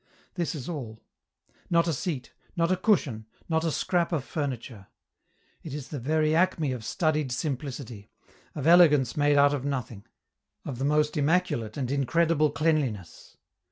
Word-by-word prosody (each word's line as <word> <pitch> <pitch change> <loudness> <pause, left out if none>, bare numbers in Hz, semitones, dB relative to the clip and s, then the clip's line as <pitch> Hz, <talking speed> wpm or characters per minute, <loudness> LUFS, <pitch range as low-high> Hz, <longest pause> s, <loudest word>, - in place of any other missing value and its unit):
This 170 -2 -2
is 135 -5 -6
all: 120 -10 -6 0.7
not 170 0 +3
a 165 - +1
seat, 140 -4 -4 0.2
not 170 0 +1
a - - +4
cushion, 155 - 0 0.2
not 160 -1 0
a 165 - +1
scrap 175 +2 0
of 155 -6 -1
furniture. 125 - -5 0.7
It 150 -3 -7
is 145 -3 -7
the 145 - -5
very 155 +4 +1
acme 165 -5 +2
of 125 -3 -5
studied 155 +1 0
simplicity, 125 -5 -5 0.5
of 145 -3 -4
elegance 155 -7 +5
made 145 0 +3
out 140 0 +5
of 140 -3 -2
nothing, 120 -6 -4 0.6
of 125 -4 -5
the 135 - -1
most 150 +1 +1
immaculate 145 -8 0
and 130 -3 -2
incredible 155 +3 +2
cleanliness. 145 - -2
145 Hz, 155 wpm, -27 LUFS, 125-160 Hz, 0.7 s, elegance